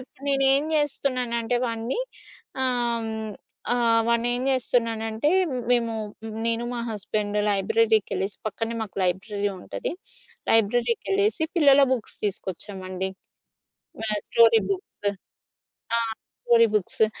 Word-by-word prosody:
ఇప్పుడు 265 +2 -14
నేనేం 275 +2 +3
చేస్తున్నానంటే 250 -5 0
వాడిని 230 - -2 0.6
ఆహ్, 240 -2 +1
హ్మ్ 220 0 -4 0.5
ఆహ్, 230 -2 +3
వాన్నేం 240 +1 +1
చేస్తున్నానంటే 230 -1 0 0.4
మేము 235 -2 +2 0.5
నేను, 230 0 0
మా 240 - -3
హస్బెండు 210 0 -2
లైబ్రరీకెళ్ళెసి 200 -1 +1
పక్కనే 225 +2 -3
మాకు 210 -4 -6
లైబ్రరీ 200 +3 -1
ఉంటది. - - -4 0.6
లైబ్రరీకెళ్ళేసి 225 0 +2
పిల్లల 280 -3 +6
బుక్స్ 240 -4 -3
తీసుకొచ్చామండి. 190 -1 -3 1.0
ఆ! - - -1 0.2
Story 230 -1 +6
books. 200 +1 -2 0.9
ఆ! - - +3 0.4
Story 230 -1 +6
books. 210 +2 +2
230 Hz, 100 wpm, -25 LUFS, 205-245 Hz, 1.0 s, పిల్లల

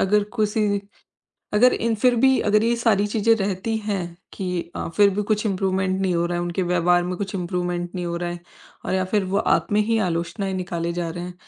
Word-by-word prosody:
अगर 210 +2 +3
किसी 210 -1 +1 0.7
अगर 245 +4 +5
इन 230 0 0
फ़िर 245 +3 +3
भी 265 +2 +4
अगर 210 +1 +4
ये 235 +1 +2
सारी 220 -4 +2
चीज़ें 225 +2 +3
रहती 200 +1 -2
हैं 205 -3 -2 0.3
कि 180 -3 -4
अ, - - -3
फ़िर 205 -1 +6
भी 210 - 0
कुछ 210 +1 0
इम्प्रूवमेंट 190 -1 0
नहीं 190 -2 +1
हो 170 0 +1
रहा 175 0 -2
है, - - -1
उनके 175 +2 -2
व्यवहार 175 0 +2
में 180 +1 -3
कुछ 195 0 -4
इम्प्रूवमेंट 175 -1 -3
नहीं 180 -1 -3
हो 170 0 -3
रहा 175 0 -3
है। 175 0 -6 0.5
और - - -1
या 190 0 +1
फ़िर 200 +2 0
वो 190 +2 -1
आप - - +1
में 210 - +4
ही 225 +1 +1
आलोचनाएँ 175 +4 -2
निकाले 170 -2 -3
जा 170 -1 -2
रहे 175 +1 -5
हैं, 180 - -7
190 Hz, 225 wpm, -23 LUFS, 175-210 Hz, 0.7 s, फ़िर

